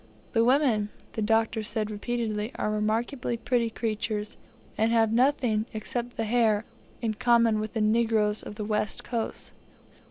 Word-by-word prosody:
The 225 - +4
women, 245 -5 +3 0.2
the 220 - -3
Doctor 225 +1 +2
said 215 0 -3
repeatedly, 215 0 -2
are 210 - -1
remarkably 230 +4 -1
pretty 235 -1 +1
creatures, 215 -1 -3 0.4
and 220 +1 +2
have 225 -1 +3
nothing, 245 -3 +2
except 240 +3 -4
the 225 - 0
hair, 220 -1 +2 0.4
in 220 -1 +1
common 230 -1 +3
with 215 0 -4
the 225 - -1
negroes 215 -1 +2
of 210 - -8
the 210 -1 -4
West 210 -1 -1
Coast. 230 -2 -3
225 Hz, 150 wpm, -27 LUFS, 215-235 Hz, 0.4 s, The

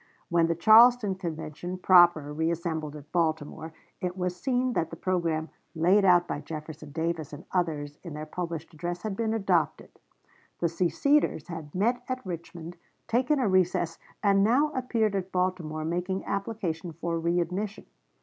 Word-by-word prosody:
When 170 -1 +3
the 165 - 0
Charleston 220 +3 +6
Convention 170 -1 -5
proper 175 -5 +5
reassembled 160 -1 -2
at 150 0 -12
Baltimore, 160 -1 -1 0.3
it 180 0 -3
was 180 -1 -1
seen 250 +4 0
that 165 - 0
the - - -7
programme 165 -4 -1 0.3
laid 180 +6 +4
out 175 -2 +5
by - - -3
Jefferson 155 -1 -8
Davis 160 -1 -3
and 145 - -9
others 150 -5 -2
in 170 -5 -8
their 155 0 -5
published 170 0 -5
address 175 +3 -5
had 215 -3 -3
been 225 +1 -1
adopted. 180 -8 0 0.6
The 170 - 0
seceders 180 - +1
had 160 -3 -7
met 235 +6 +1
at 255 -2 -3
Richmond, 170 -1 -7 0.3
taken 255 +6 +2
a 255 -5 +1
recess, 180 -3 +1 0.2
and 195 -1 +4
now 270 +8 +3
appeared 230 -5 0
at 190 -1 -3
Baltimore 180 -4 -1
making 180 +3 -2
application 195 -5 -3
for 170 +1 -3
readmission. 180 +5 -1
175 Hz, 150 wpm, -28 LUFS, 160-195 Hz, 0.6 s, Charleston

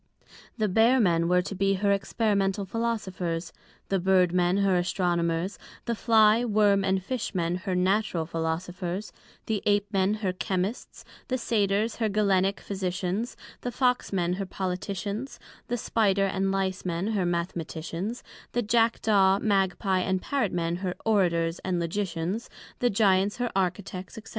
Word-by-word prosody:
The 215 -2 +1
Bear 225 +6 +4
men 170 -6 +3
were 180 +1 +3
to 195 - -5
be 195 +1 +1
her 200 +1 +1
Experimental 200 -1 0
Philosophers, 190 -6 -3 0.4
the 195 - +1
Bird 185 -1 +3
men 180 +1 +2
her 195 -2 +3
Astronomers, 175 0 0 0.3
the 235 - 0
Fly 220 0 +4
Worm 205 -3 +3
and 190 -1 +1
Fish 235 0 -3
men 170 -1 0
her 185 0 -3
Natural 185 -2 +1
Philosophers, 175 +4 -3 0.3
the 215 -3 -1
Ape 205 -1 +3
men 195 +2 +2
her 185 - +1
Chymists, 190 +4 -3 0.2
the 255 - 0
Satyrs 210 -2 0
her 225 -2 0
Galenick 200 -1 +2
Physicians, 190 +3 -3 0.2
the 245 - -3
Fox 250 0 +1
men 180 -2 0
her - - -2
Politicians, 195 +6 -4 0.3
the 245 - -1
Spider 200 -4 +2
and 195 0 0
Lice 190 -1 -1
men 180 +3 -2
her 205 -4 0
Mathematicians, 170 +4 -3 0.3
the 240 - +1
Jackdaw 215 -3 +3
Magpie 195 -2 +1
and 185 +1 0
Parrot 260 -2 -1
men 170 0 -1
her 180 -1 -3
Orators 170 -6 +2
and 185 -2 -1
Logicians, 175 +3 -2 0.3
the 245 - +3
Gyants 200 -1 +2
her 245 -1 -1
Architects, 185 0 -2
&c. 220 - -7
195 Hz, 150 wpm, -27 LUFS, 180-210 Hz, 0.4 s, Bear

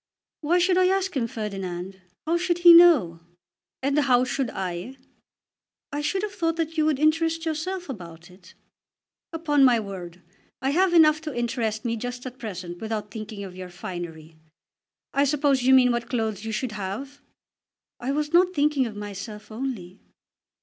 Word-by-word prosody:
"Why 325 +4 +1
should 360 +1 +3
I 365 - +4
ask 380 -1 0
him, 240 -4 0
Ferdinand? 195 -4 -6 0.2
How 330 +2 +1
should 345 0 0
he 345 - +12
know?" 310 - +6 0.6
"And 280 +2 +2
how 255 -4 +3
should 265 -1 -2
I?" 185 +7 -5 0.9
"I 290 - -3
should 380 +6 -1
have 420 -1 -3
thought 330 -3 -1
that 325 -1 -3
you 310 -1 +2
would 310 -3 +2
interest 325 +2 +1
yourself 350 +4 -3
about 175 - -9
it." 180 0 -18 0.8
"Upon 310 -4 +2
my 245 -3 +5
word 185 -4 -8 0.4
I 270 +1 0
have 355 +3 +2
enough 310 -2 +6
to 305 -5 -6
interest 230 -2 -2
me 230 -1 -1
just 245 +2 -6
at 255 0 -8
present, 180 -6 -6
without 215 -2 -4
thinking 215 -1 -7
of 185 -2 -9
your 185 -1 -8
finery. 165 -3 -8 0.8
I 280 - +3
suppose 285 -2 +2
you 260 +2 +4
mean 250 -1 +5
what 235 0 -2
clothes 220 -3 -2
you 225 - -3
should 220 +2 -2
have?" 215 +8 -6 0.8
"I 250 +3 -2
was 300 +2 -2
not 365 +1 +4
thinking 285 -3 +2
of 215 - -8
myself 205 +1 -8
only." 215 -6 -5
250 Hz, 170 wpm, -25 LUFS, 205-310 Hz, 0.9 s, he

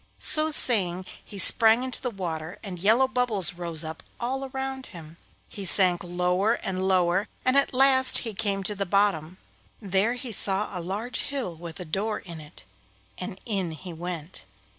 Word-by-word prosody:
So 310 0 +2
saying 185 - +3 0.2
he 205 - -11
sprang 225 +5 +7
into 260 -1 -4
the 250 - -3
water, 175 -4 -6
and 185 -4 -8
yellow 225 +8 +3
bubbles 245 -8 +1
rose 170 -3 -2
up 160 0 -8 0.2
all 265 +3 -4
around 265 0 -6
him. 165 -1 -13 0.3
He 200 - -9
sank 180 -1 +4
lower 180 +4 -1
and 190 -4 -4
lower, 185 +1 +1 0.2
and 255 - +2
at 280 - +2
last 260 0 +6
he 225 - -5
came 200 -1 -3
to 210 - -3
the 200 -1 -5
bottom. 185 -3 -1 0.4
There 200 +3 -1
he 250 -1 -8
saw 200 0 -1
a 180 - -4
large 210 +8 -4
hill 265 -12 -5
with 165 +1 -10
a 180 - -5
door 205 +7 -3
in 170 -4 -11
it, 150 -1 -13 0.6
and 190 +1 -7
in 195 -7 -3
he 175 +3 -10
went. 170 0 -8
195 Hz, 175 wpm, -25 LUFS, 175-235 Hz, 0.6 s, sprang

